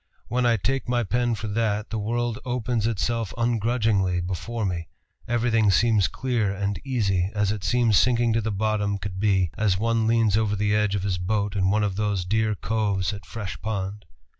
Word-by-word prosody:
When 125 0 +1
I 115 -1 +3
take 135 +5 -2
my 120 -1 +1
pen 120 +4 0
for 110 +1 -5
that, 105 0 -1
the 110 - -2
world 120 +2 -1
opens 120 -3 -1
itself 115 -1 -1
ungrudgingly 110 -5 +1
before 100 +6 -3
me; 85 -4 -3 0.4
everything 115 -2 +2
seems 105 +1 +3
clear 120 -6 -1
and 100 0 -2
easy, 100 -9 0
as 105 -1 +1
it 105 -2 -4
seems 115 -6 +3
sinking 120 -2 +2
to 115 - +1
the 110 - -2
bottom 105 0 0
could 95 0 -6
be 95 -5 +2
as 100 -4 +2
one 115 +1 +1
leans 115 -2 +3
over 105 -2 +1
the 105 +1 0
edge 105 -1 +1
of 95 - -2
his 95 -3 -1
boat 100 +2 -1
in 95 -1 +2
one 105 +2 +2
of 100 -2 -1
those 105 -4 0
dear 110 +2 +1
coves 100 -2 -1
at 95 -4 -9
Fresh 100 +2 -6
Pond.... 100 -1 -4
105 Hz, 190 wpm, -25 LUFS, 100-115 Hz, 0.4 s, I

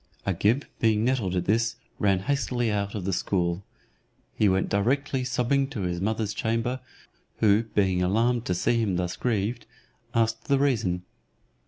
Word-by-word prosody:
Agib 105 +8 +1
being 110 -1 +2
nettled 120 -8 0
at 90 -1 0
this, 115 +2 +1 0.2
ran 100 -2 +2
hastily 120 -1 0
out 100 0 -2
of 100 -4 -4
the 95 - 0
school. 85 0 0 0.7
He 105 - +3
went 95 0 +1
directly 130 +6 0
sobbing 130 +2 +1
to 135 -7 -5
his 90 -1 -2
mother's 110 0 -1
chamber, 115 +4 -1 0.6
who 110 +1 +4
being 95 -3 +2
alarmed 115 +6 +1
to 90 - 0
see 115 +6 +1
him 100 -5 0
thus 90 0 -2
grieved, 115 -1 -1 0.5
asked 115 0 +1
the 140 - +3
reason. 110 -11 +1
110 Hz, 155 wpm, -26 LUFS, 95-120 Hz, 0.7 s, who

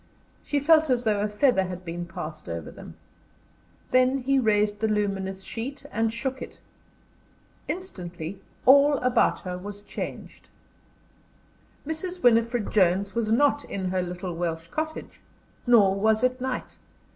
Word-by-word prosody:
She 290 - 0
felt 315 +1 +4
as 245 -1 +2
though 215 -3 +1
a 210 - +1
feather 210 -2 +2
had 180 0 -7
been 175 +1 -5
passed 155 - -7
over 85 -1 -5
them. - - -12 1.0
Then 255 +1 +4
he 270 +1 +1
raised 210 -3 +2
the 220 - +1
luminous 195 -2 -1
sheet 255 +8 -6
and 225 +1 0
shook 260 +3 -4
it. - - -9 1.1
Instantly 185 - -6 0.2
all 280 +2 +7
about 250 -3 +2
her 180 -1 -5
was 205 +2 -8
changed. - - -7 1.4
Mrs. 355 +4 -4
Winifred 230 -1 +3
Jones 195 0 +2
was 230 -2 -1
not 285 +4 +3
in 190 -2 -3
her 185 0 0
little 180 0 -5
Welsh 165 -1 -3
cottage; 315 - -5 0.5
nor 210 -6 +6
was 215 +3 +2
it 255 0 +1
night. 255 -1 -4
215 Hz, 140 wpm, -26 LUFS, 190-255 Hz, 1.4 s, all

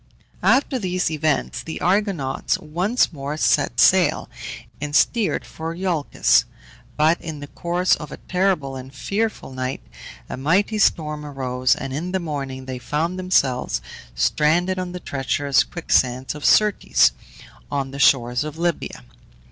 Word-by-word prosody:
After 265 0 +3
these 185 -4 -1
events 155 -2 0
the 160 - -6
Argonauts 185 -8 0
once 180 +9 0
more 145 +1 -5
set - - +2
sail, - - +4 0.5
and 145 0 -3
steered 225 +4 +2
for 165 +1 -6
Iolcus; 175 -5 +2 0.5
but, 155 +3 +3
in 160 -3 -6
the 145 - -7
course 175 +5 0
of 150 -2 -9
a - - -7
terrible 180 -7 0
and 130 0 -8
fearful 200 +2 -3
night, 130 0 -4 0.4
a - - -6
mighty 185 +10 +1
storm 150 -6 +1
arose, 130 -3 0
and 135 - -5
in 170 +6 -4
the 190 - +1
morning 135 -5 -5
they 130 -1 -5
found 155 +9 -2
themselves 135 - +1 0.4
stranded 155 - +2
on 180 -1 -4
the 180 - -6
treacherous 140 -2 +1
quicksands 130 -6 0
of 150 -1 -7
Syrtes, 210 -2 +4 0.6
on 135 -2 -2
the 140 - -7
shores 125 -3 +3
of 155 0 -6
Libya. 170 - -2
150 Hz, 140 wpm, -22 LUFS, 135-180 Hz, 0.6 s, sail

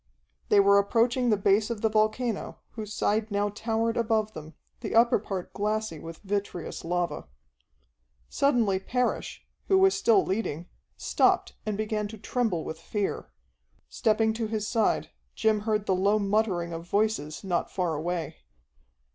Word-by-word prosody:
They 205 - +6
were 200 0 +6
approaching 235 +4 +2
the 210 - +3
base 200 +2 +2
of 230 -3 -4
the 225 - +3
volcano, 215 +1 0
whose 215 -2 -7
side 215 +1 0
now 205 0 0
towered 225 +2 -1
above 220 -2 +1
them, 155 0 -10 0.2
the - - -4
upper 235 -1 +5
part 195 -3 -5
glassy 210 -4 -2
with 165 +1 -9
vitreous 200 -4 -3
lava. 170 - -2 1.0
Suddenly 235 -9 +2
Parrish, 250 +5 -2 0.2
who 385 - +4
was 385 0 +5
still 420 -5 +3
leading, 185 -5 -2 0.3
stopped - - +2
and 210 -2 -1
began 215 -1 -1
to 220 +1 -9
tremble 215 -6 -1
with 160 - -6
fear. 200 +4 -3 0.6
Stepping 220 - +2
to 225 0 -2
his 215 -1 -2
side, 225 -2 +1 0.2
Jim 220 -1 +2
heard 210 -1 +1
the 190 - +2
low 200 +3 +3
muttering 200 -4 0
of 165 +1 -7
voices 205 -8 0
not 180 -3 -1
far 180 -4 -1
away. 165 0 -3
210 Hz, 150 wpm, -27 LUFS, 190-225 Hz, 1.0 s, They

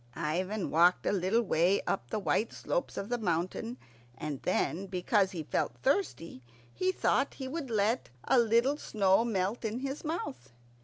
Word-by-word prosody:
Ivan 180 +6 -2
walked 175 +3 +4
a - - +2
little 200 +4 +2
way 180 0 +3
up 120 +1 -2
the - - -1
white 215 +2 0
slopes - - -2
of 200 - -4
the 245 0 -1
mountain, 185 +5 -2 0.4
and 150 -3 -4
then, 190 +4 0
because 190 +2 +2
he 175 -5 -5
felt - - -1
thirsty, 265 - 0 0.3
he 370 0 +1
thought - - +1
he 265 - -5
would 285 -1 -4
let 220 +2 +1
a 260 - +4
little 235 +5 +3
snow 200 -5 +2
melt 205 0 -1
in 225 +3 -2
his 275 +1 -4
mouth. 135 - -5
205 Hz, 165 wpm, -31 LUFS, 180-245 Hz, 0.4 s, walked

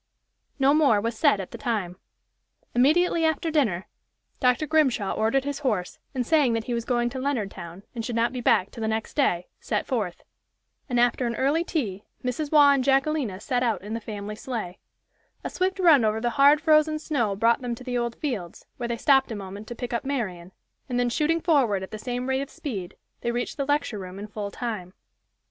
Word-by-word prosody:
No 275 0 +4
more 285 -9 +4
was 230 +3 -2
said 210 -2 +3
at 190 - -6
the - - -8
time. 205 -7 -2 0.8
Immediately 325 +7 +3
after 320 +1 +1
dinner 215 - +1 0.5
Dr. 250 +4 +2
Grimshaw 270 -10 +2
ordered 225 +5 +1
his 285 0 -3
horse, 215 -11 -2 0.2
and 250 -2 0
saying 290 -4 +3
that 225 -1 -1
he 245 - -3
was 235 -1 -2
going 240 -1 +1
to 260 - -5
Leonardtown 200 -9 -4
and 230 -2 -4
should 235 +1 -3
not 230 +2 +1
be 250 - -4
back 190 -4 +3
till 230 - -9
the 220 - 0
next 220 0 -2
day, 180 - +1
set - - -2
forth. 210 -9 -3 0.7
And 245 -1 +1
after 245 +1 +2
an 235 - -2
early 290 +5 +2
tea, 215 - -3 0.2
Mrs. 255 +4 -2
Waugh 290 -2 +7
and 275 -2 +2
Jacquelina 270 -6 +1
set 245 +4 -1
out 230 -5 0
in 210 +2 -5
the 230 - -3
family 210 -1 -6
sleigh. 220 -8 -5 0.6
A - - -4
swift 375 +1 0
run 325 -9 +6
over 215 0 +1
the 240 +1 0
hard, 285 +3 +5
frozen 310 -1 +4
snow 260 -10 -1
brought 230 +4 +3
them 245 -2 -3
to 250 +1 -4
Old 235 -1 -2
Fields, 215 - -5
where 240 -2 -4
they 235 - -1
stopped 270 0 +3
a - - -3
moment 200 +1 -8
to 240 - -6
pick 245 +1 -5
up 235 - -1
Marian, 190 -11 -3 0.4
and 245 -1 0
then 245 0 +2
shooting 320 +5 +1
forward 270 - +2
at 190 - -8
the 215 - -6
same 245 +2 -3
rate 265 0 +1
of 275 - -5
speed, 195 - -6 0.2
they 235 - -2
reached 240 +1 -2
the 280 - -2
lecture 290 -7 0
room 185 0 -8
in 205 - -6
full 210 -1 -5
time. 200 -5 -5
240 Hz, 210 wpm, -25 LUFS, 215-280 Hz, 0.8 s, Waugh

